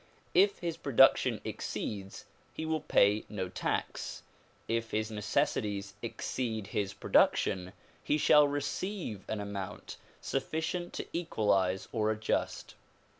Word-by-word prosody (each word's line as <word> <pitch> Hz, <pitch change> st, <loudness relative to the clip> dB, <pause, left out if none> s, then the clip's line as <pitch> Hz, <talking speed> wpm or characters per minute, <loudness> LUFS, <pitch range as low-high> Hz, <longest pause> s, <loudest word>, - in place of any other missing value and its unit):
If 200 Hz, +3 st, +5 dB
his 170 Hz, -2 st, -3 dB
production 135 Hz, -4 st, +4 dB
exceeds 100 Hz, -2 st, -5 dB, 0.3 s
he 160 Hz, -, -3 dB
will 160 Hz, 0 st, 0 dB
pay 105 Hz, +2 st, +4 dB
no 95 Hz, -3 st, -3 dB
tax; 95 Hz, -, -3 dB, 0.4 s
if 115 Hz, 0 st, -1 dB
his 110 Hz, +1 st, -1 dB
necessities 105 Hz, -1 st, -1 dB
exceed 110 Hz, -5 st, -3 dB
his 100 Hz, 0 st, -2 dB
production 90 Hz, -1 st, +2 dB, 0.3 s
he 150 Hz, -, +2 dB
shall 150 Hz, 0 st, +6 dB
receive 145 Hz, -, -3 dB
an 110 Hz, -, -2 dB
amount 100 Hz, -1 st, -6 dB, 0.2 s
sufficient 160 Hz, +5 st, -2 dB
to -, -, -4 dB
equalize 100 Hz, -, +1 dB
or 110 Hz, -2 st, +1 dB
adjust. 110 Hz, 0 st, -1 dB
110 Hz, 115 wpm, -31 LUFS, 100-150 Hz, 0.4 s, shall